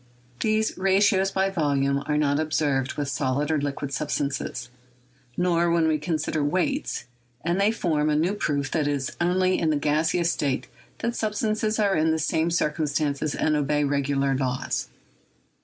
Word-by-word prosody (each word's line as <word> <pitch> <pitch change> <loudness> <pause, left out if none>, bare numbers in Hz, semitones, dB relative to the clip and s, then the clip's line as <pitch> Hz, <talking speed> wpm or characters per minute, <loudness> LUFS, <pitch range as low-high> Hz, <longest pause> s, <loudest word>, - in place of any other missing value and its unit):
These 220 -2 0
ratios 195 0 +3
by 195 0 0
volume 140 -5 +1
are 150 - +1
not 145 -1 +2
observed 145 -4 0
with 145 -1 -2
solid 140 +3 -1
or 155 -2 +1
liquid 140 -1 -3
sub 150 +2 -2
stances, 135 -4 -2 0.7
nor 175 -1 +2
when 170 -1 +3
we 155 -1 +1
consider 155 -1 -1
weights, 185 - -1 0.4
and 175 +3 +1
they 205 +2 +4
form 155 -9 0
a 150 - +2
new 170 +6 +1
proof 145 -8 -1
that 155 -3 +1
it 145 - +1
is 135 -2 -3
only 185 +1 +2
in 160 - +1
the 155 - +2
gaseous 160 +4 +1
state 140 -3 -1 0.3
that 235 0 -2
sub 215 -1 -2
stances 215 0 0
are 200 -3 +2
in 155 +1 +2
the 160 - +2
same 160 +1 0
circumstances 150 -3 0
and 155 - +1
obey 150 0 +1
regular 140 -1 +1
laws. 130 -1 -2
155 Hz, 170 wpm, -25 LUFS, 145-180 Hz, 0.7 s, they